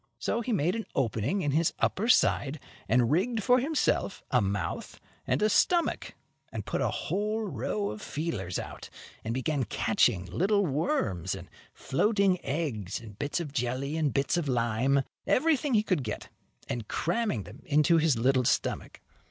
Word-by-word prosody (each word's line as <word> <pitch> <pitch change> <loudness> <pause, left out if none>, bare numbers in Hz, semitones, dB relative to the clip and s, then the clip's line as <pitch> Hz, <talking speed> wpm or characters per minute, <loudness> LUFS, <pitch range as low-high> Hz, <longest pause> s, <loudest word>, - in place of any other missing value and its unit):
So 235 - -1
he 240 - -3
made 180 -1 +1
an 225 - -4
opening 130 - 0
in 145 - +1
his 160 +3 +2
upper 215 +4 0
side, 145 - +3 0.3
and 120 +1 +3
rigged 215 +7 +1
for 250 0 +5
himself 290 -7 0
a 125 - +4
mouth 100 -1 -3 0.3
and - - +1
a - - +5
stomach, 340 - +2 0.4
and - - -5
put - - -2
a - - +2
whole 215 +2 -1
row 105 - -2
of 105 - -8
feelers 115 - -3
out, - - -7 0.3
and 110 - -3
began 130 +3 0
catching 95 -4 +1
little 195 - +1
worms 130 - -1
and 90 -2 -10 0.2
floating 195 +5 +1
eggs 125 - -2
and 110 -3 -12
bits 145 +4 -1
of 150 -5 -5
jelly 130 +2 -1
and 155 -3 +1
bits 140 +4 +1
of 170 -4 -1
lime, 125 +2 +2 0.2
everything 295 -2 +2
he 210 - +4
could 185 -9 0
get, 105 -3 -5 0.4
and 115 -3 -4
cramming 175 - -1
them 110 +9 -12
into 150 +3 +4
his 155 -5 +3
little 130 +2 +3
stomach. - - -1
145 Hz, 165 wpm, -29 LUFS, -, 0.4 s, for